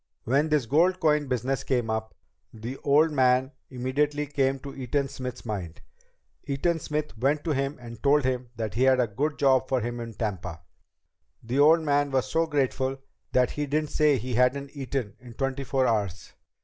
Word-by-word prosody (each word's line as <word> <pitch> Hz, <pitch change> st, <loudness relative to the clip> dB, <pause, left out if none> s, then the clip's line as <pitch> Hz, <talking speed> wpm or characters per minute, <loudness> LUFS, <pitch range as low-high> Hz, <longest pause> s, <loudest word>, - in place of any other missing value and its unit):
When 140 Hz, +6 st, +2 dB
this 150 Hz, -5 st, +2 dB
gold 170 Hz, +9 st, +3 dB
coin 150 Hz, -3 st, +2 dB
business 130 Hz, +2 st, -1 dB
came 120 Hz, -4 st, 0 dB
up, 110 Hz, 0 st, -3 dB, 0.4 s
the 115 Hz, +4 st, -7 dB
old 150 Hz, +3 st, +3 dB
man 130 Hz, -1 st, +3 dB, 0.2 s
immediately 145 Hz, +4 st, -1 dB
came 135 Hz, -2 st, 0 dB
to 140 Hz, 0 st, -8 dB
Eaton 135 Hz, +2 st, -1 dB
Smith's 125 Hz, -2 st, -7 dB
mind. 95 Hz, -7 st, -5 dB, 0.6 s
Eaton 155 Hz, +4 st, 0 dB
Smith 150 Hz, -2 st, -3 dB
went 145 Hz, +4 st, +1 dB
to 165 Hz, -, -1 dB
him 140 Hz, +1 st, -1 dB
and 120 Hz, -1 st, -10 dB
told 145 Hz, +1 st, +4 dB
him 125 Hz, -1 st, -1 dB
that 110 Hz, -2 st, -4 dB
he 115 Hz, -, -2 dB
had 130 Hz, -1 st, +5 dB
a 125 Hz, -, +4 dB
good 140 Hz, +8 st, -2 dB
job 130 Hz, -2 st, +3 dB
for 130 Hz, -, +2 dB
him 120 Hz, +1 st, -4 dB
in 115 Hz, -2 st, -7 dB
Tampa. 90 Hz, -6 st, -4 dB, 0.8 s
The 125 Hz, +4 st, -1 dB
old 160 Hz, +3 st, +6 dB
man 145 Hz, -2 st, +1 dB
was 135 Hz, -2 st, +1 dB
so 165 Hz, 0 st, 0 dB
grateful 135 Hz, -2 st, 0 dB, 0.4 s
that 125 Hz, -1 st, +3 dB
he 150 Hz, 0 st, -3 dB
didn't 150 Hz, +1 st, -1 dB
say 150 Hz, -3 st, +3 dB
he 125 Hz, +2 st, -4 dB
hadn't 130 Hz, +3 st, +1 dB
eaten 135 Hz, -7 st, -4 dB
in 120 Hz, -2 st, -13 dB
twenty 135 Hz, +1 st, -2 dB
four 135 Hz, -1 st, +1 dB
hours. 100 Hz, -6 st, -1 dB
135 Hz, 185 wpm, -27 LUFS, 120-145 Hz, 0.8 s, old